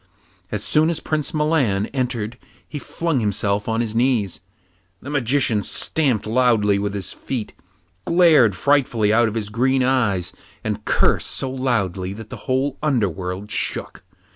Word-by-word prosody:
As - - -2
soon 155 +2 +3
as 165 -2 -1
Prince 155 -2 -2
Milan 150 - +1
entered 120 -3 -2 0.3
he 150 - -6
flung 165 -1 -2
himself 105 -1 -1
on 115 +1 +1
his 110 -2 -3
knees. 115 -7 +1 0.6
The 140 - -8
Magician 130 -5 +1
stamped 130 -1 0
loudly 110 -3 +3
with 100 0 -2
his 100 - -5
feet, 125 -5 -5 0.5
glared 160 - +5
frightfully 120 -3 +2
out 120 +1 +4
of 110 - -4
his 105 -2 -3
green 130 +4 +1
eyes, 115 -9 +1 0.3
and - - -3
cursed - - +2
so 130 - -2
loudly 100 -8 -1
that 110 +1 -10
the - - -6
whole 130 +1 0
underworld 100 - -1
shook. - - -3
120 Hz, 145 wpm, -21 LUFS, 105-135 Hz, 0.6 s, glared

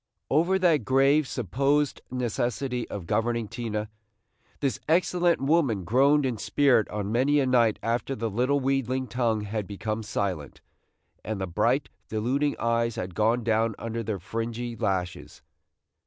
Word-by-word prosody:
Over 170 +6 +3
that 170 -8 +3
grave 135 +4 +3
supposed 140 - 0
necessity 125 0 -2
of 100 -4 -6
governing 115 +3 0
Tina, 110 -2 -4 0.7
this 140 -2 -1
excellent 175 0 +3
woman 135 - +2
groaned 135 - +3
in 120 -5 -2
spirit 135 -5 +3
on 105 -1 -3
many 135 +5 +3
a 135 - +2
night 120 -4 +3
after 120 +4 -1
the 115 -1 -2
little 125 +7 +1
wheedling 130 -1 0
tongue 120 -4 0
had 105 -1 -4
become 110 +3 -3
silent, 100 -8 -3 0.6
and 110 -2 -4
the 95 - -1
bright, 85 - +1 0.2
deluding 130 +7 0
eyes 115 0 0
had 90 0 -5
gone 115 +5 +1
down 110 -1 +1
under 115 0 -4
their 110 -2 -3
fringy 115 +5 -4
lashes. 95 -6 -3
120 Hz, 140 wpm, -26 LUFS, 110-135 Hz, 0.7 s, Over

